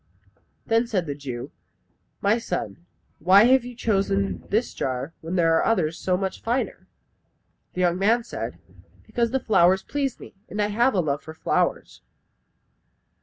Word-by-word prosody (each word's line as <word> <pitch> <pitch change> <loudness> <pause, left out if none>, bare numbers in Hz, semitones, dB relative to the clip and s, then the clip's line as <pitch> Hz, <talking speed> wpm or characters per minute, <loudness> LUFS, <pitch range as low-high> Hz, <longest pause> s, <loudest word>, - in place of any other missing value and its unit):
Then 230 +1 +2
said 195 -7 -1
the 145 - -3
Jew, 130 -4 -7 0.7
"My 210 +4 +3
son, 175 -4 -5 0.3
why 190 +5 +6
have 255 +1 +5
you 245 0 -8
chosen 200 -3 0
this 220 +4 0
jar, 130 +4 -3
when 165 +3 -4
there 165 -2 +3
are - - +3
others 175 -7 +1
so 180 -1 +1
much 190 0 -3
finer?" 240 +3 -2 0.9
The 180 - -2
young 175 0 +2
man 230 +4 +3
said, 115 - -6 0.5
"Because 235 +1 0
the 265 +3 0
flowers 190 -4 +3
please 275 -3 -2
me, - - -12 0.2
and 210 - -5
I 210 0 +1
have 235 +3 +2
a 185 - +3
love 145 -2 -1
for 160 - -10
flowers." - - -1
195 Hz, 160 wpm, -24 LUFS, 170-230 Hz, 0.9 s, why